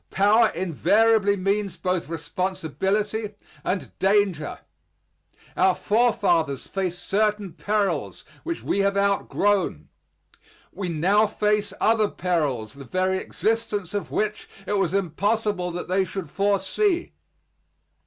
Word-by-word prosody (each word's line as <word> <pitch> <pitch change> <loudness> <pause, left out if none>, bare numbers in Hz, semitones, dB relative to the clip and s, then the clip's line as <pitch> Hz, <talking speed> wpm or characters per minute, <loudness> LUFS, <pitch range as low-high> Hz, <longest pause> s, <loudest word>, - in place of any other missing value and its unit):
Power 215 +4 +4
invariably 200 +4 +3
means 200 +1 -1
both 180 -4 -2
responsibility 190 +6 -2 0.3
and 185 0 -3
danger. 195 -6 +1 1.0
Our 185 0 +3
forefathers 185 - +1
faced 185 -2 -4
certain 210 -2 0
perils 205 -1 -1 0.2
which 335 -1 -4
we - - 0
have 200 0 +2
outgrown. 200 - +1 0.8
We 185 -1 -4
now 190 +7 +3
face 210 -1 0
other 220 -2 +3
perils 145 -12 -1
the 140 0 -10
very 185 +8 0
existence 215 -5 -2
of 205 - -3
which 215 0 -2 0.2
it 205 0 0
was 190 -1 0
impossible 200 +1 0
that 175 0 -5
they 190 +1 +2
should 185 -4 -6
foresee. 205 - 0
195 Hz, 110 wpm, -24 LUFS, 180-210 Hz, 1.0 s, Power